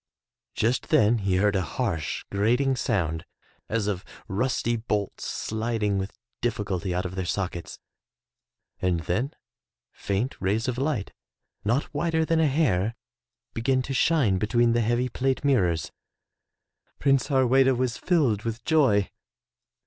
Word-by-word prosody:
Just 120 +2 0
then 110 +2 +4
he 100 -2 0
heard 100 +2 +2
a 95 - +2
harsh, 80 -2 -2
grating 120 +7 +2
sound, 85 -11 -1 0.5
as 110 -2 0
of 100 -2 -2 0.2
rusty 120 +2 0
bolts 105 -3 -2
sliding 110 -2 -1
with 95 +1 -5 0.2
difficulty 100 -5 -1
out 90 +2 -1
of 90 - -4
their 95 0 -2
sockets, 90 -1 -3 1.0
and 90 -2 +1
then 120 - -2 0.6
faint 100 +7 -2
rays 105 +5 0
of 125 -1 -1
Ught 135 -8 -1 0.5
not 120 +8 0
wider 160 +2 +1
than 165 0 +2
a 160 - +4
hair 115 - +1 0.6
began 130 +3 +1
to 135 - -4
shine 130 - +3
between 120 +3 +2
the 120 - +2
heavy 120 +3 +1
plate 130 +3 -1
mirrors. 90 - +2 1.1
Prince 135 -2 +2
Harweda 130 -1 +4
was 125 -2 -1
filled 140 - +2
with 115 +1 -4
joy. 130 -11 +3
115 Hz, 135 wpm, -26 LUFS, 100-130 Hz, 1.1 s, then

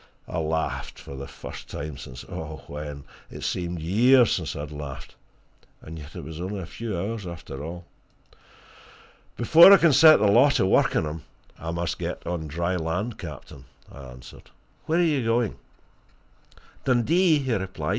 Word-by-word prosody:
I 90 - -3
laughed 80 0 -2
for 70 - -10
the 70 +1 -7
first - - -10
time 75 0 -6
since 65 -2 -10
when? 75 -2 -7 0.3
It - - -9
seemed 90 -1 -2
years 120 +9 +4
since 80 -5 -2
I 70 - -5
had 75 0 -7
laughed 75 -2 -8 0.7
and 80 +1 -10
yet 75 +1 -12
it - - -7
was 80 +3 -8
only 95 +3 -4
a 95 - -6
few 110 +1 -5
hours, 100 +2 -4
after 80 -5 -8
all. 85 +2 -7 1.5
"Before 165 - +8
I 200 - +10
can 170 -4 +4
set 155 +2 +8
the - - +1
law 120 +8 +6
to 140 - +2
work 95 - +3
on - - +1
him, 75 +1 -5 0.4
I 80 - -6
must 85 0 -3
get - - -5
on 85 -3 -3
dry 85 +4 -2
land, 90 +8 -3
captain," 70 -5 -10 0.3
I 70 -1 -11
answered. 65 0 -13 0.4
"Where 160 - +1
are 175 - +4
you 150 -6 +1
going?" 115 -1 0 1.3
"Dundee," 155 +7 +3
he 130 -4 -1
replied. 95 -2 -3
85 Hz, 170 wpm, -25 LUFS, 75-115 Hz, 1.5 s, I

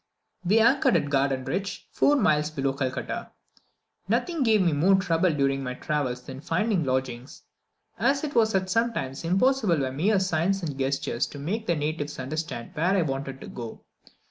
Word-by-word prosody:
We 195 +5 +3
anchored 235 -1 +4
at 145 -3 -2
Gardenrich, 135 +7 -1
four 290 - +3
miles 150 - +2
below 135 -3 -1
Calcutta. 130 -1 -3 0.8
Nothing 335 -4 0
gave 225 -4 +4
me 170 -3 +2
more 175 +7 +4
trouble 185 -2 +2
during 135 -2 +1
my 125 -1 -4
travels 130 -4 -2
than 130 +2 -9
finding 180 +3 0
lodgings, 130 -1 -3 0.6
as 275 +1 +2
it 295 -1 -3
was 220 -3 +3
sometimes 200 - -1
impossible 195 +1 +2
by 135 -2 -1
mere 190 +10 +2
signs 190 +1 0
and 150 -4 -3
gestures 135 -1 -1
to - - -10
make 200 +11 -3
the 170 - +2
natives 150 0 -3
understand 135 -2 -4
where 180 +5 +1
I 180 - +3
wanted 135 -2 -4
to - - -8
go. 115 -2 -8
155 Hz, 165 wpm, -26 LUFS, 135-195 Hz, 0.8 s, anchored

